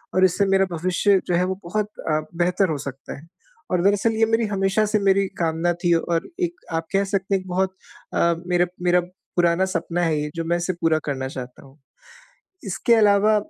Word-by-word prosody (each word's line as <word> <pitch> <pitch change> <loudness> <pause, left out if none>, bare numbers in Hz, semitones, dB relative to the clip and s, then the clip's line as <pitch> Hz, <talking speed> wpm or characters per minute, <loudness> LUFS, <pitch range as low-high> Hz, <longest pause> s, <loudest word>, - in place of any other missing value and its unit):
और 185 - +5
इससे 185 +2 +2
मेरा 195 0 +3
भविष्य 185 +4 +2
जो 175 - +1
है 180 - +2
वो 190 +1 -2
बहुत 210 +4 -2 0.2
अ, 155 - +2 0.2
बेहतर 180 +2 +1
हो 155 - -1
सकता 135 -1 -7
है। 145 - -14 0.5
और 180 -1 +2
दरअसल 205 +3 +3
ये 225 - +4
मेरी 225 +1 +1
हमेशा 195 +1 +1
से 215 0 +1
मेरी 195 0 +3
कामना 165 +1 +1
थी 175 -1 +4
और 165 +1 -1
एक 345 -1 -1 0.2
आप 165 0 -1
कह 195 +1 +3
सकते 195 0 -2
हैं 190 - 0
एक 185 - -14
बहुत 190 +1 -1 0.4
अ, 170 0 +2
मेरा 175 0 +3 0.2
मेरा 180 0 +4 0.3
पुराना 175 +1 +3
सपना 175 -1 -2
है 160 -3 +1
ये 150 - -3
जो 165 - -2
मैं 170 +1 +1
इसे 175 +2 -2
पूरा 165 -2 +1
करना 135 -2 -2
चाहता 130 -2 -8
हूँ। 135 +2 -19 0.9
इसके 230 +5 +2
अलावा 210 0 +4
180 Hz, 205 wpm, -23 LUFS, 165-195 Hz, 0.9 s, और